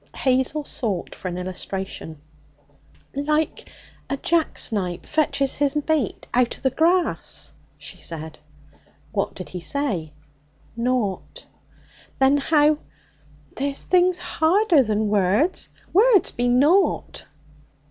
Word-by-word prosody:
Hazel 260 +3 +1
sought 210 -10 -3
for - - -7
an 180 -1 -4
illustration. 185 -3 -5 0.9
'Like 300 +3 -1 0.4
a 275 - -1
jacksnipe 220 - 0
fetches 285 -3 0
his 285 0 +1
mate 310 - -1
out 245 -1 +2
o' - - -19
the 265 - +1
grass,' 340 +6 0 0.2
she - - -9
said. 160 -1 -6 0.7
'What - - -2
did - - -8
he 180 - -6
say?' 185 - -2 0.6
'Nought.' 240 - -2 0.7
'Then 270 +2 +4
how 300 +1 +3 0.4
?' 145 -1 -30
'There's 275 +3 -2
things 365 0 +3
harder 350 0 +3
than 215 -2 0
words; 205 - +1 0.2
words 420 +1 +5
be 245 +1 0
nought.' 295 +11 +2
265 Hz, 110 wpm, -23 LUFS, 195-310 Hz, 0.9 s, words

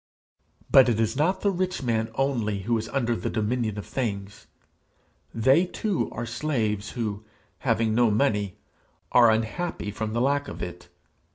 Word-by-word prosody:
But 130 -2 +7
it 115 -2 +1
is 110 +2 +1
not 180 +7 +1
the 200 - +2
rich 185 -4 -2
man 115 -2 0
only 115 -7 0
who 115 +4 0
is 110 - -6
under 120 -4 0
the - - -3
dominion 110 -1 -1
of 105 - -5
things; 100 -6 -4 0.8
they 135 +10 +3
too 200 +1 -1
are 120 - -4
slaves 115 -5 -2
who, 110 -3 -3 0.4
having 115 -1 +1
no 120 0 +4
money, 105 -4 +1 0.5
are 120 -2 +7
unhappy 110 - -1
from 110 +1 -4
the 120 - 0
lack 140 +2 +1
of - - -6
it. 90 0 -8
115 Hz, 160 wpm, -26 LUFS, 110-135 Hz, 0.8 s, But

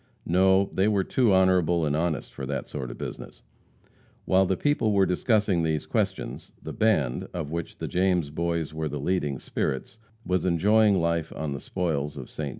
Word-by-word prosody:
No, 95 +3 +3
they 95 +2 +2
were 100 -3 +2
too 120 0 +2
honorable 90 -3 +3
and 75 -1 0
honest 80 -2 -2
for 70 -2 -6
that 70 +1 -3
sort 65 - -5
of - - -8
business. - - -8 0.8
While 95 0 +3
the 95 - 0
people 145 -7 +1
were 100 -1 +4
discussing 100 -1 +1
these 80 -2 -1
questions, - - -3
the - - -7
band, 75 - +1
of 80 -4 -4
which 85 0 -5
the - - -4
James 90 -5 +1
Boys 85 -1 -2
were 80 -1 -3
the 75 0 -4
leading 75 -3 -1
spirits, 65 - -3 0.3
was 90 0 0
enjoying 100 +4 +4
life 85 -1 0
on 75 -2 -3
the 70 - -6
spoils 75 -5 -2
of 65 - -8
Ste. 75 - -4
85 Hz, 180 wpm, -26 LUFS, 75-95 Hz, 0.8 s, were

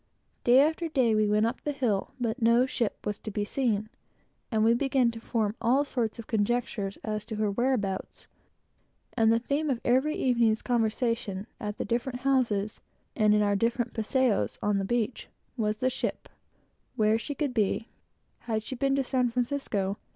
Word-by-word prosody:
Day 245 +2 +6
after 320 +3 +1
day, 255 -7 +2
we 215 0 +3
went 210 +1 +3
up 235 +3 -2
the 295 - -2
hill, 240 -8 -1
but 235 +1 -2
no 235 +2 +5
ship 235 -4 -3
was 210 0 -2
to - - -6
be 205 0 -2
seen, 215 -3 0 0.6
and 220 -2 +2
we 225 +1 +5
began 255 -1 +2
to 230 - -8
form 220 -2 -1
all 260 +5 +3
sorts 235 -5 -2
of 230 - -8
conjectures 215 -2 -1
as 215 -1 -3
to 220 - -5
her 210 -1 0
whereabouts; 205 -4 -1 0.9
and 225 -2 +4
the 230 - +4
theme 285 +6 -1
of 255 -4 0
every 265 +5 +2
evening's 235 -4 +2
conversation 230 -4 0
at 210 -3 -4
the - - -3
different 245 +3 -2
houses, 235 -6 +1 0.4
and 210 -1 +4
in 210 - +3
our 205 - +2
afternoon's 230 +3 0
paséo 240 +1 +1
upon 205 -2 0
the 195 - -1
beach, 240 +2 -1 0.3
was 215 -3 -1
the 255 +3 +1
ship - - -3 0.7
where 220 -1 +3
she 285 +5 -5
could 285 -4 -1
be 220 0 0 0.6
had 220 -1 0
she 260 - -6
been 270 +2 +1
to 275 - +1
San 250 -1 +1
Francisco? 235 -5 -2
230 Hz, 180 wpm, -28 LUFS, 215-255 Hz, 0.9 s, Day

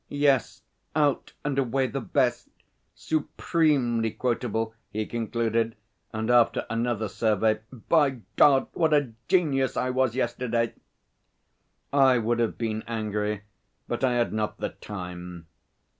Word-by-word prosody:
'Yes, 140 -3 +1 0.3
out 145 -3 +1
and 140 -2 0
away 135 +1 +1
the 135 +1 -3
best 120 -1 0 0.5
supremely 145 -7 +1
quotable,' 115 -1 -1 0.2
he 110 +1 -2
concluded, 115 0 -1 0.4
and 110 +2 -1
after 120 -1 +4
another 115 -1 0
survey 110 +1 +1
'By 135 +1 +1
God, 135 -2 +6
what 160 -2 +3
a 145 -5 +1 0.2
genius 140 -8 +2
I 130 - +1
was 130 -2 +1
yesterday!' 120 -2 0 1.2
I 135 -2 +5
would 120 +1 0
have 115 -2 0
been 110 -2 -2
angry, 105 -2 -2 0.4
but - - -3
I 130 -2 +3
had 120 -2 +1
not 110 -1 -2
the - - -2
time. 90 -3 -8
120 Hz, 125 wpm, -26 LUFS, 110-135 Hz, 1.2 s, God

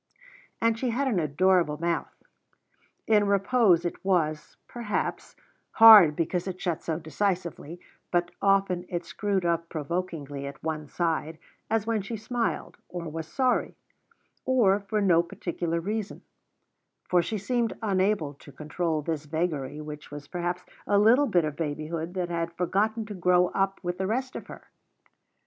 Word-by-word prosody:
And 230 0 +1
she 255 - 0
had 265 +4 0
an 220 -8 +1
adorable 165 +1 +2
mouth. 170 0 -1 0.9
In 210 -2 +3
repose 200 -3 +3
it 175 - -4
was, 160 -5 0
perhaps, 230 -4 -3 0.4
hard, 215 -9 +9
because 175 +3 -1
it 185 -1 -5
shut 175 -4 -2
so 160 -2 -2
decisively; 175 0 -3 0.3
but 175 -1 0
often 195 -3 +2
it 175 -1 -3
screwed 190 +2 -1
up 170 0 0
provokingly 150 -3 -4
at 140 -1 -10
one 155 -1 -3
side, 165 -1 -2 0.3
as 220 -1 +1
when 225 -2 0
she 220 +4 -5
smiled, 230 +2 -3
or 175 -2 -5
was 160 0 -6
sorry, 255 +6 0 0.7
or 220 -7 +3
for 210 +1 -2
no 175 -4 +4
particular 170 -1 -3
reason; 210 +4 -4 0.8
for 180 -1 +3
she 215 +6 -3
seemed 230 +3 -1
unable 190 -6 +1
to 140 +1 -15
control 155 +2 -2
this 155 -1 -3
vagary, 150 -3 -2
which 150 0 -8
was 145 0 -9
perhaps 175 0 -3 0.2
a 205 - +3
little 235 +8 +5
bit 175 -8 +2
of 150 -1 -4
babyhood 160 +3 -4
that 180 -2 -2
had 170 -1 -2
forgotten 210 +6 0
to 210 - -7
grow 180 -1 +3
up 195 0 -1
with 175 0 -3
the 190 - 0
rest 255 +4 -2
of - - -7
her. - - -11
180 Hz, 155 wpm, -27 LUFS, 160-205 Hz, 0.9 s, hard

